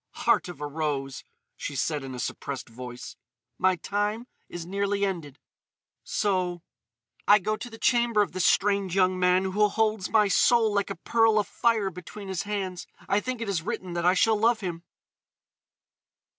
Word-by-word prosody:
"Heart - - +3
of 175 -4 -9
a 150 - -4
rose," 145 -3 -3 0.3
she 145 - -5
said 145 +2 -1
in 130 -1 -6
a - - -7
suppressed 135 +1 -4
voice, 125 +1 -9 0.4
"my 185 0 +3
time 205 +6 -2 0.2
is 175 -1 -6
nearly 200 +2 0
ended.... 165 -8 -4 0.7
So.... 180 -5 -1 0.6
I 205 - +8
go 215 +2 -1
to 245 +3 -8
the 225 - -11
chamber 235 -3 +3
of 195 - -6
this 185 -2 +1
strange 200 -2 +2
young 185 -1 +3
man 180 +1 +3
who 205 +3 +2
holds 215 -2 0
my 210 -1 +4
soul 220 +2 +4
like 200 -1 0
a 195 - -4
pearl 225 +4 +2
afire 210 0 +1
between 190 +3 -9
his 190 -2 -2
hands.... 190 -3 -3 0.2
I 200 - +2
think 255 +1 -4
it 230 - -3
it 185 -5 0
written 180 +1 -4
that 170 0 -2
I 180 - +5
shall 220 +3 +3
love 225 0 +3
him." 175 -3 -4
190 Hz, 170 wpm, -27 LUFS, 175-210 Hz, 0.7 s, I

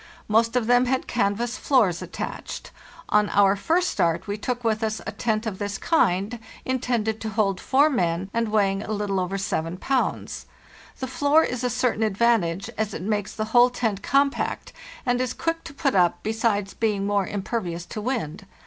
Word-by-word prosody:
Most 225 +2 +2
of 245 -3 +2
them 245 +2 +4
had 260 +1 0
canvas 235 +2 -1
floors 215 - +2
attached. - - -6 0.4
On 210 0 +3
our 200 -1 +4
first 335 - +1
start 165 -1 0
we 205 -1 -3
took 245 +3 -3
with 220 -1 +1
us 220 0 -1
a - - -3
tent 215 +1 -1
of 205 -4 -4
this 205 -1 -3
kind, 210 - +1 0.3
intended 235 -4 -1
to 220 - -3
hold 200 -3 0
four 280 +3 +4
men 180 - 0
and 230 0 +1
weighing 200 -2 +2
a 215 - -4
little 205 -2 -1
over 185 +2 -2
7 175 -3 -2
pounds. 265 +6 -2 0.5
The 260 - -2
floor 285 +4 +3
is 250 0 -3
a 250 - +1
certain 240 -1 0
advantage, 210 -4 +2
as 215 -2 -1
it - - -5
makes 210 0 -1
the 215 - -2
whole 245 0 +7
tent 225 -5 -2
compact 275 +4 0 0.3
and 245 0 +1
is 255 -1 -2
quick 330 0 -2
to - - -7
put 280 -3 +1
up, 180 -3 +2
besides 215 -2 0
being 210 -3 0
more 200 -1 +1
impervious 190 -4 -3
to 215 - -6
wind. 210 - -3
220 Hz, 185 wpm, -24 LUFS, 195-245 Hz, 0.5 s, whole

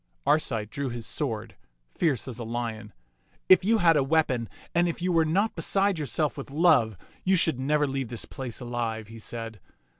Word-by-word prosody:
Arcite 130 -7 +1
drew 140 -2 -3
his 120 -2 -6
sword, 115 -6 -3 0.4
fierce 140 -9 0
as 125 -2 -6
a - - -4
lion. 115 -2 -4 0.6
If 185 - +7
you 225 +4 +3
had 170 -5 +5
a 145 - +3
weapon 135 - +1 0.2
and 175 0 +3
if 170 - -4
you 180 +1 0
were 165 -2 +4
not 195 +8 +1
beside 195 +2 +1
yourself 150 +1 -1
with 140 - -7
love, 135 - +3 0.3
you 190 +1 +3
should 160 -6 +2
never 150 +2 +2
leave 135 -2 -2
this 115 0 -5
place 125 -4 -6
alive," 115 -3 -3
he 115 0 -10
said. 115 -1 -7
135 Hz, 185 wpm, -27 LUFS, 115-160 Hz, 0.6 s, If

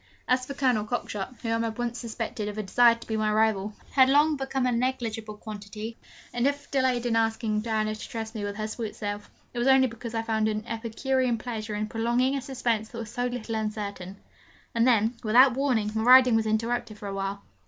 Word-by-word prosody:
As 255 0 +1
for 280 - -6
Colonel 250 -6 +2
Cockshott, 230 -1 -4
whom 230 0 0
I - - 0
had 220 - -6
once 240 0 -2
suspected 225 -2 -4
of 210 0 -5
a 215 - -2
desire 235 +4 +5
to 230 - -12
be 220 - -3
my 215 -1 +1
rival, 215 -1 +1
he - - -24
had 260 -1 +6
long 295 +3 +4
become 270 -1 -2
a 250 - +2
'negligible 230 -3 -2
quantity;' 215 +1 -7 0.4
and 245 +2 +2
if 285 0 -1
I - - -23
delayed 260 -3 +1
in 235 -2 +1
asking 225 -1 +1
Diana 215 -1 -1
to 215 - -8
trust 220 -1 -5
me 215 -3 -4
with 205 0 -3
her 215 0 -3
sweet 220 -1 -5
self, 205 0 -5 0.2
it 240 - -3
was 240 - +1
only 265 0 +6
because 230 -1 -6
I 225 - 0
found 220 -1 +1
an 215 0 -2
epicurean 235 +2 -1
pleasure 220 -2 -5
in 210 +1 -1
prolonging 240 +5 +1
a 275 - -2
suspense 235 -5 -1
that 235 - -9
was 225 -1 -6
so 245 0 -1
little 245 -2 -5
uncertain. 205 -3 -4 0.6
And 230 +1 +3
then, 230 -1 +3
without 245 +4 +6
warning, 245 -6 +1
my 220 - -1
riding 250 0 +7
was 220 -1 +1
interrupted 220 0 -1
for 205 - -7
a 195 - -4
while. 195 +1 -3
225 Hz, 225 wpm, -27 LUFS, 215-245 Hz, 0.6 s, riding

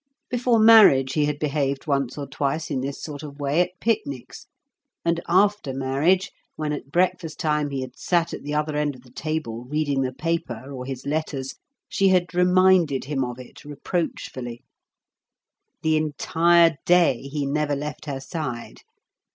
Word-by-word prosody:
Before 245 -1 +2
marriage 215 -13 +7
he 150 0 +2
had 145 0 -1
behaved 140 -2 -1
once 140 -4 -1
or 145 - -4
twice 140 +4 -2
in 130 - -1
this 140 +1 -5
sort 145 -2 -6
of 145 -2 -10
way 145 +4 +2
at 180 +1 -3
picnics; 140 - -3 0.6
and 170 0 +1
after 190 -6 +2
marriage, 140 +8 +1 0.2
when 150 -1 -2
at 140 -1 -7
breakfast 180 -2 0
time 150 -3 0
he 135 -1 -3
had 130 -1 -8
sat 170 -2 +1
at - - -6
the 145 +1 -4
other 150 0 -1
end 150 -2 0
of 125 - -15
the 125 - -19
table 155 -8 -4
reading 145 0 0
the 130 -1 -1
paper 135 -4 -3
or 125 -1 -6
his 130 -1 -6
letters, 140 -3 -3 0.3
she 195 - +2
had 180 -3 +2
reminded 180 -5 +4
him 135 -2 -1
of 125 -1 -5
it 125 - -12
reproachfully. 140 -5 -4 1.2
The 160 0 +3
entire 165 +2 +3
day 175 -8 +4
he 145 -1 -2
never 145 +1 0
left 150 +2 -6
her 135 -2 -3
side. 135 -4 -6
150 Hz, 165 wpm, -24 LUFS, 135-170 Hz, 1.2 s, marriage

